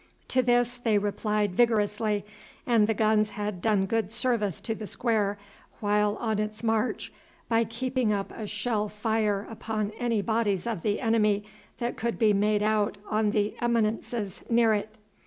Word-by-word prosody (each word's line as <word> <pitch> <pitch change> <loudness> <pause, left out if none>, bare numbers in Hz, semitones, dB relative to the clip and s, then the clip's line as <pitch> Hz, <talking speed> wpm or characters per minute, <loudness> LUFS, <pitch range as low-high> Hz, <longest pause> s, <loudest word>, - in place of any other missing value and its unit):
To 255 - +3
this 245 0 +2
they 225 -3 +2
replied 205 0 0
vigorously, 210 -2 +1 0.4
and 225 -4 +4
the 220 - +1
guns 215 0 +3
had 205 -4 -4
done 205 -2 +2
good 220 0 -1
service 230 -5 0
to 225 - -2
the 220 -1 -7
square 210 -4 0 0.4
while 210 0 +2
on 220 -3 -1
its 215 +1 -3
march 225 +1 0 0.3
by 230 0 +2
keeping 250 +1 -1
up 200 -1 -2
a 215 - -5
shell 215 0 -1
fire 210 -1 0
upon 215 -2 -3
any 230 -4 0
bodies 220 -5 0
of 230 -7 -2
the 205 +2 0
enemy 215 -3 +2 0.3
that 240 0 -3
could 235 +1 -2
be 215 -3 +4
made 210 +1 +2
out 210 -1 +1
on 215 0 +2
the 210 0 0
eminences 225 -3 -1
near 230 -1 +4
it. 215 +1 -3
215 Hz, 160 wpm, -27 LUFS, 210-230 Hz, 0.4 s, and